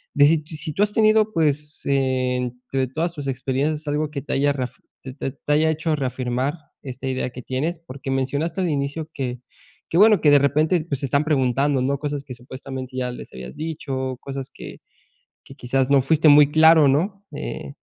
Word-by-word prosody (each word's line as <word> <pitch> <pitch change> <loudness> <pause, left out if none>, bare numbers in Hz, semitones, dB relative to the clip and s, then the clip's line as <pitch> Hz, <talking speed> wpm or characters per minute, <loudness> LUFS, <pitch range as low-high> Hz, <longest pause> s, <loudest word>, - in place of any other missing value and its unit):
de 145 - +6 0.2
si 155 -1 -5
tú 200 - +2
has 210 0 0
tenido, 215 0 +3
pues, 150 -2 0
entre 130 -1 -1
todas 165 +6 -2
tus 145 -4 -6
experiencias, 135 +4 -1
algo 150 +1 -1
que 140 -2 -4
te 145 - -7
haya 145 +1 +2
reaf 125 -4 -4 0.2
te 130 - -8
te 135 -1 -4
te 145 - -6
haya 155 +2 +3
hecho 160 0 0
reafirmar 130 0 -1 0.3
esta 130 0 -6
idea 130 -1 -2
que 125 - -8
tienes. 150 +8 -3
Porque 140 -3 -7
mencionaste 140 +7 -1
al 180 - 0
inicio 145 +2 -2
que 125 -3 -4 0.5
que 165 - 0
bueno 210 -1 +6
que 150 - +5
de 145 - +8
repente, 155 +4 +2
pues, 140 -4 -2
te 140 - -1
están 140 +3 +2
preguntando, 135 -1 +1
¿no? 140 +2 0
Cosas 145 -1 -3
que 130 - -8
supuestamente 130 +1 -8
ya 125 -1 -1
les 125 - -10
habías 65 0 -9
dicho, 135 -5 -4
cosas 135 -1 -6
que - - -10 0.6
que - - -13
quizás 130 +2 0
no 140 -1 +6
fuiste 155 +3 +3
muy 145 0 +7
claro, 160 -1 +6
¿no? 190 +9 0
Eh, - - -6
140 Hz, 190 wpm, -22 LUFS, 130-155 Hz, 0.6 s, de